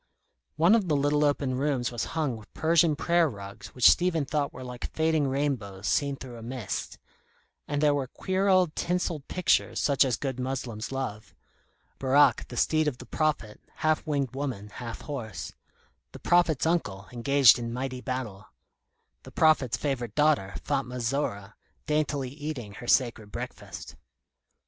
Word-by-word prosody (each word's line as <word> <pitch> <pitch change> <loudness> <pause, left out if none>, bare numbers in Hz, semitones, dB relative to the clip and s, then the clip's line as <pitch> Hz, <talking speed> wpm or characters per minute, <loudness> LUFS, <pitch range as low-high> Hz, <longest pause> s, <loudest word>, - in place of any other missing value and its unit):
One 170 +6 +5
of 220 -5 +3
the 155 - +2
little 145 +1 +2
open 145 -2 +1
rooms 135 -4 0
was 120 - -2
hung 150 -6 0
with 110 -2 -13
Persian 160 -1 +3
prayer 170 +1 +2
rugs 100 -4 -9
which 125 - +6
Stephen 165 -4 +3
thought 145 0 -1
were 130 - -9
like 125 -1 -6
fading 160 -2 +2
rainbows 130 -9 -2
seen 140 +4 +1
through 130 -3 -9
a - - -10
mist; 120 -2 -5 0.7
and 145 0 -1
there 150 -1 +5
were 140 -2 -1
queer 190 +8 -1
old 185 -4 +3
tinselled 170 -4 -2
pictures 180 -2 +1
such 140 -2 +3
as 130 -4 0
good 130 -2 -4
Moslems 125 -3 -4
love: 130 -6 -5 0.6
Borak, 135 +2 +4
the - - -8
steed 155 -1 +2
of 135 -4 -1
the - - -10
prophet, 150 -9 -1 0.2
half 155 0 +2
winged 140 -4 -1
woman, 130 -7 -4
half 115 +2 -7
horse; 120 -9 -6 0.6
the - - -9
Prophet's 175 -5 +3
uncle 105 - -1
engaged 135 +1 +5
in 115 -1 -4
mighty 130 +1 -4
battle; 115 -8 -5 0.7
the - - -12
Prophet's 155 -7 +3
favourite 125 -6 -3
daughter, 150 -10 +2
Fatma 130 -3 -2
Zora, 115 -5 -2 0.3
daintily 150 -3 0
eating 140 -7 -6
her 120 - -9
sacred 120 -6 +2
breakfast. - - -7
135 Hz, 155 wpm, -28 LUFS, 120-150 Hz, 0.7 s, which